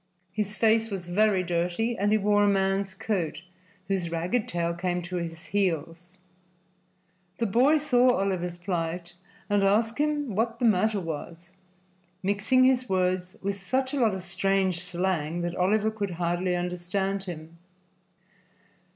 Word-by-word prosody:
His 210 0 -3
face 225 +1 +3
was 195 -4 -5
very 190 +1 +2
dirty 175 +7 -1
and 205 -1 +1
he 215 - +5
wore 205 0 +3
a - - +4
man's 195 -1 +1
coat, 175 -6 -2 0.4
whose 185 -3 -1
ragged 175 +8 -1
tails 170 0 -1
came 180 -1 -1
to 180 +1 -4
his 165 -1 -5
heels. 175 -2 -1 1.2
The 230 - 0
boy 250 +9 +4
saw 250 -4 +4
Oliver's 180 -3 -1
plight 175 -1 -3 0.3
and 205 -1 +2
asked 220 +5 +2
him 295 -5 0
what 230 +2 0
the 245 - 0
matter 215 0 +3
was, 170 +1 -7 0.7
mixing 205 +6 +3
his 255 -1 +3
words 185 -1 0
with 200 0 -2
such 260 +7 -1
a 285 - 0
lot 220 -5 +3
of 190 - -6
strange 190 0 0
slang 175 -3 -1
that 175 0 -3
Oliver 210 +4 +2
could 200 -5 -4
hardly 175 +1 0
understand 180 +2 -2
him. 170 -2 -8
190 Hz, 145 wpm, -27 LUFS, 175-215 Hz, 1.2 s, he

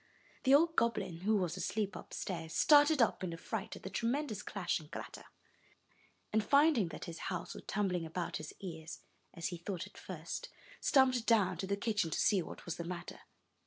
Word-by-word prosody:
The 265 +1 +7
old 330 +2 +4
goblin, 215 -7 +1
who 215 +4 +2
was 180 -4 -1
asleep 210 -2 -1
upstairs, 165 -4 -5
started 290 -2 +6
up 215 - 0
in 175 -2 -2
a - - -6
fright 200 +4 -4
at - - -12
the - - -4
tremendous 240 -3 -1
clash 180 -4 -1
and 155 -1 -14
clatter, - - -7 1.1
and, 220 0 +3
finding 280 - +4
that 155 - -7
his 170 -1 -7
house 180 -1 -4
was - - -10
tumbling 190 -3 0
about 170 +2 -3
his 155 -1 -7
ears, 160 -4 -7 0.3
as 170 - -2
he 175 - -5
thought 175 +1 -4
at - - -14
first, - - -6 0.3
stumped 255 -4 +4
down 195 -6 +4
to 190 - -3
the 200 +1 0
kitchen 205 -5 0
to - - -2
see 200 -3 +4
what - - -9
was 175 - -4
the 170 - -3
matter. 175 0 -6
195 Hz, 195 wpm, -34 LUFS, 170-230 Hz, 1.1 s, The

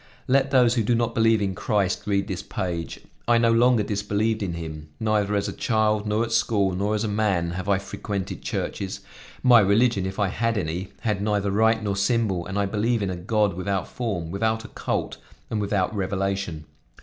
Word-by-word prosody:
Let 135 +1 +3
those 125 -3 +4
who 120 - +1
do 120 +3 +2
not 115 0 0
believe 115 -2 +3
in 95 -1 -1
Christ 100 0 -1
read 100 -1 +1
this 95 -1 -3
page; 85 -4 -4 0.3
I 120 0 +5
no 115 0 +4
longer 120 -1 +4
disbelieved 105 +2 -1
in 90 -4 -2
him. 80 -2 -7
Neither 105 -2 +1
as 100 0 0
a - - -4
child, 110 -2 +1
nor 105 +2 +1
at 115 - -4
school, 110 -4 +2
nor 100 +4 0
as 105 - -1
a - - 0
man, 100 -5 0
have 95 +3 -4
I 100 - +4
frequented 100 0 -5
churches; 95 -1 -4 0.4
my 125 -2 +8
religion, 100 -1 +3
if 95 - -6
I 100 -2 +1
had 115 +2 0
any, 90 +1 -3
had 105 -3 -1
neither 100 -1 0
rite 110 +2 +3
nor 100 -2 -1
symbol, 100 -3 0
and 95 +1 -4
I 100 - +2
believed 110 +2 0
in 95 - -1
a - - -3
God 105 +3 +1
without 95 +1 -2
form, 100 -9 -3
without 110 +3 -1
a - - -9
cult, - - -3 0.3
and 110 -2 0
without 100 -1 0
revelation. 95 -4 -2
105 Hz, 200 wpm, -24 LUFS, 95-110 Hz, 0.4 s, my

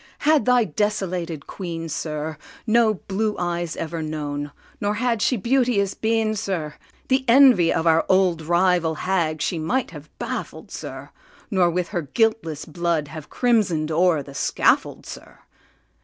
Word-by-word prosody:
had 310 -1 +4
thy 250 -1 +4
desolated 180 -5 -2
Queen, 165 -3 -6
sir, 155 0 -4 0.3
No 225 -1 +3
blue 210 +3 -2
eyes 175 -1 -2
ever 165 0 -4
known, 145 -2 -4 0.3
nor 205 +1 -1
had 230 -1 0
she 250 - +2
beauteous 235 -3 +1
been, 220 -1 0
sir, 185 -8 -3 0.3
The 260 0 +2
envy 240 -9 +6
of 165 - 0
our 165 0 +4
old 185 -3 +3
rival 170 0 +2
hag 165 -4 -1
she 170 - -1
might 180 +11 -1
have 150 -2 -11
baffled, - - -6
sir, - - -8 0.4
Nor 185 -3 +3
with 175 0 -2
her 175 -4 -2
guiltless 165 - 0
blood 165 -2 -1
have 155 0 -9
crimson'd 195 -11 +1
o'er 165 -2 +2
the 140 - -12
scaffold, 135 - +1
sir. - - -11
175 Hz, 145 wpm, -23 LUFS, 160-215 Hz, 0.4 s, envy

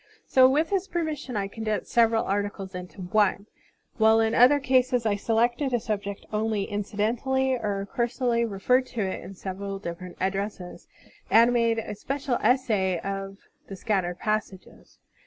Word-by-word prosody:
So 260 -1 +5
with 310 +6 +1
his 390 -1 0
permission 305 -8 -3
I 200 -1 -1
con 220 +3 -8
densed 215 -1 -1
several 230 -1 +2
articles 200 -1 -3
into 180 +1 -8
one, 200 +2 +1 0.5
while 220 0 +5
in 225 0 +2
other 255 +5 +6
cases 255 -2 +2
I 210 -2 +2
selected 240 +5 +1
a - - +1
subject 200 -2 -4
only 215 -1 0
incidentally 225 +6 -1
or 205 -5 -2
cursorily 235 0 0
referred 235 +5 +1
to 235 - -4
in 195 0 -4
several 195 +1 -5
different 180 -1 -7
addresses, 195 -1 -4 0.4
and 235 +2 +5
made 230 -1 +2
a 225 - -4
special 270 +4 -2
essay 210 -9 +2
of 195 0 -5 0.3
the 195 - -7
scattered 185 -3 -1
passages. 215 -3 -4
220 Hz, 150 wpm, -26 LUFS, 195-245 Hz, 0.5 s, other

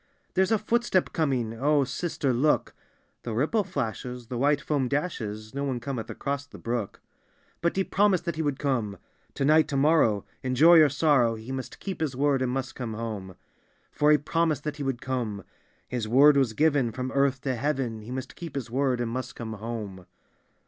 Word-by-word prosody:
— - - -42
"There's 190 +2 +2
a 220 - +5
footstep 220 -3 +1
coming; 130 -8 0
O 145 +5 +2
sister, 140 -1 -2
look," 145 +6 +1 0.2
— - - -42
"The 115 -2 -4
ripple 160 - +1
flashes, 125 - -4
the 125 - -4
jvhite 140 +4 +2
foam 145 -4 0
dashes; 110 -8 -3
No 140 +1 -3
one 130 -3 -1
cometh 120 -2 -5
across 140 0 -3
the - - -12
brook." 115 -3 -4 0.3
— - - -37
"But 170 - +1
he 195 - +2
promised 190 -3 +2
that 170 -2 -2
he 160 - -2
would 145 -3 -1
come: 120 -9 -1 0.4
To 135 - 0
night, 155 +2 +5
to 140 - -2
morrow, 135 -8 +3 0.2
in 130 0 -2
joy 165 +4 +8
or 150 - +6
sorrow. 135 -5 +3
He 110 +3 -8
must 130 -1 -6
keep 190 -4 -5
his 145 -5 -1
word, 140 0 +2
and 125 -1 0
must 130 0 -3
come 115 -4 -5
home. 105 -5 -5 0.6
"For 150 - +2
he 150 - +6
promised 155 0 0
that 150 0 -4
he - - -7
would 135 -3 -3
come; 115 -7 -3 0.4
His 120 -4 -3
word 140 +6 +6
was 135 -5 +2
given; 145 -3 +2
from 130 +3 -4
earth 140 -1 +1
to 130 -1 -1
heaven, 125 -3 -2
He 110 - -11
must 130 0 -5
keep 170 -5 -8
his 120 -5 -4
word, 130 -1 +1
and 115 -1 -2
must 130 +2 -4
come 110 -2 -6
home. 105 -4 -6
135 Hz, 205 wpm, -27 LUFS, 120-150 Hz, 0.6 s, joy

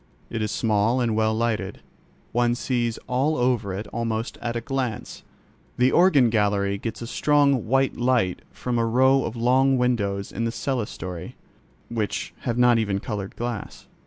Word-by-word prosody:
It 115 - -2
is 110 - -1
small 110 +2 +1
and 115 -3 +1
well 110 0 +2
lighted; 110 -4 -2 0.5
one 120 0 +2
sees 120 -2 -1
all 135 +5 +1
over 120 -5 +1
it 100 +3 -4
almost 115 0 -3
at 120 0 -3
a - - 0
glance. 130 -4 -4 0.6
The 125 +1 +4
organ 145 -10 +5
gallery 100 -2 +1
gets 115 +2 -5
a - - -4
strong 140 -1 +2
white 135 +2 +2
light 120 -7 +1
from 120 -1 -3
a 115 - +2
row 130 +3 +4
of 115 - -4
long 130 +3 +3
windows 100 -6 0
in 115 - -3
the 115 - -1
clerestory, 105 -9 -4 0.5
which 110 -3 -3
have 120 -1 -2
not 125 -1 +5
even 100 -3 0
coloured 100 -1 -5
glass. 120 -2 -5
115 Hz, 160 wpm, -24 LUFS, 110-125 Hz, 0.6 s, organ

